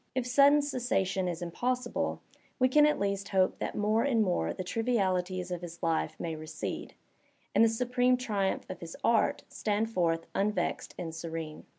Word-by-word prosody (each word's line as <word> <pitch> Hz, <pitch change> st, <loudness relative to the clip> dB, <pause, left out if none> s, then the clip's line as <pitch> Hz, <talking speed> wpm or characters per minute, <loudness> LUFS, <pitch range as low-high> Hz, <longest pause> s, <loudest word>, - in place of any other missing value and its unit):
If 255 Hz, -2 st, 0 dB
sudden 280 Hz, +3 st, +5 dB
cessation 235 Hz, -9 st, 0 dB
is 175 Hz, 0 st, -3 dB
impossible, 245 Hz, +8 st, -2 dB, 0.4 s
we 255 Hz, 0 st, +3 dB
can 295 Hz, +3 st, +6 dB
at 300 Hz, -, +2 dB
least 200 Hz, 0 st, -1 dB
hope 190 Hz, -1 st, +2 dB
that -, -, -3 dB
more 215 Hz, +2 st, +2 dB
and 235 Hz, -5 st, +3 dB
more 130 Hz, -, 0 dB
the -, -, -5 dB
trivialities 185 Hz, -4 st, 0 dB
of 175 Hz, -1 st, -3 dB
his 170 Hz, -1 st, -9 dB
life 165 Hz, -1 st, 0 dB
may 165 Hz, -2 st, -3 dB
recede, 155 Hz, 0 st, -6 dB, 0.6 s
and -, -, +5 dB
the 230 Hz, -, +6 dB
su 225 Hz, +3 st, -1 dB
preme 250 Hz, +1 st, +3 dB
triumph 205 Hz, -6 st, -1 dB
of 185 Hz, -, -7 dB
his 165 Hz, -1 st, -8 dB
art 230 Hz, -, +2 dB
stand 215 Hz, +1 st, -1 dB
forth 165 Hz, -4 st, +1 dB
unvexed 200 Hz, -3 st, -1 dB
and 165 Hz, -2 st, -5 dB
serene. 165 Hz, -1 st, -6 dB
200 Hz, 175 wpm, -30 LUFS, 175-245 Hz, 0.6 s, can